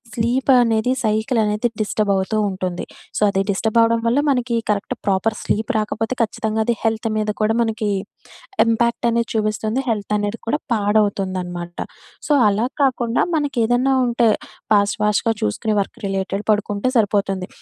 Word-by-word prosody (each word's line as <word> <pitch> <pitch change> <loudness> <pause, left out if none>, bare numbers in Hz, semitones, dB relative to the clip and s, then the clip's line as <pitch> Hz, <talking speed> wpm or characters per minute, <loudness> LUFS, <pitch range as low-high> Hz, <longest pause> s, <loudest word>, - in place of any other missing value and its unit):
స్లీపనేది, 240 -1 +2
సైకిలనేది 220 0 +1 0.2
డిస్టబవుతూ 205 0 0
ఉంటుంది. 185 -2 -4 0.4
సో, - - -10
అది 195 - +1
డిస్టబవడం 230 +3 +2
వల్ల 245 +4 +2
మనకి 245 -2 -1
కరెక్ట్ 200 -1 -2
ప్రోపర్ 200 +3 +1
స్లీప్ 215 +1 -1
రాకపోతే 220 +2 -2
కచ్చితంగా 220 0 -2
అది 235 - +2
హెల్త్ 225 0 0
మీద 215 0 -1
కూడా 215 +1 +2
మనకి 225 -2 0 0.8
ఇంపాక్టనేది 235 0 +1
చూపిస్తుంది. 215 +2 -1
హెల్తనేది 210 0 -1
కూడా 230 +6 +1
పాడవుతుందనమాట. 190 -5 0 0.5
సో, - - -2 0.2
అలా 210 +3 +1 0.2
కాకుండా 245 -3 +1
మనకేదన్నా 260 -3 +1
ఉంటే 240 -1 +2 0.4
ఫాస్ట్ 205 -1 +3
ఫాస్ట్‌గా 210 +2 +2
చూసుకునే 160 - -1
వర్క్ 195 - -4
రిలేటెడ్ 195 +1 -2
పడుకుంటే 205 +1 0
సరిపోతుంది. 200 -4 +1
215 Hz, 125 wpm, -20 LUFS, 205-235 Hz, 0.8 s, ఫాస్ట్